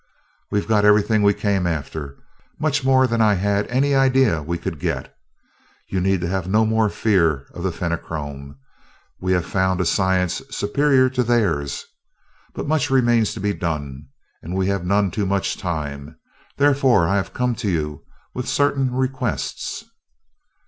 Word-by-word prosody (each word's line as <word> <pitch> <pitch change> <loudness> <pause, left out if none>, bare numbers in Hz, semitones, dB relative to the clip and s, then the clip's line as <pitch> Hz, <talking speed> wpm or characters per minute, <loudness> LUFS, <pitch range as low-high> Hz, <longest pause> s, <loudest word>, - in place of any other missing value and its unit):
"We've 105 - -1
got 105 -2 +3
everything 105 +1 +4
we 100 -1 +4
came 100 -4 0
after 75 -3 -4 0.4
much 150 -4 0
more 130 0 +4
than 115 -2 0
I 105 -2 +4
had 100 +2 0
any 135 +3 +1
idea 130 - +3
we 85 +3 -3
could 85 -2 -5
get. - - -3 0.7
You 95 - -1
need 95 -1 +1
have 90 +1 -2
no 110 +3 +3
more 110 -1 +2
fear 85 -11 +1
of 90 - -8
the 95 +1 -1
Fenachrone 75 -5 -5 0.6
we 95 0 0
have 90 -2 0
found 95 -1 0
a 90 - +1
science 95 -1 +1
superior 130 +5 +2
to 130 -1 0
theirs. 100 - 0 0.7
But - - -4
much 150 -2 +1
remains 120 -4 +2
to - - -6
be 100 +1 0
done, 75 -6 -4 0.3
and 85 +3 -6
we 95 0 +1
have 100 -3 -1
none 100 +1 +1
too 100 +3 -1
much 100 0 0
time; 75 -3 -5 0.4
therefore 135 -10 +3
I 100 - +1
have 100 - -2
come 125 -1 0
to 115 -4 -2
you 75 -4 -2 0.3
with 125 0 -4
certain 140 -2 +1
requests." 130 -3 -3
100 Hz, 160 wpm, -21 LUFS, 85-120 Hz, 0.7 s, everything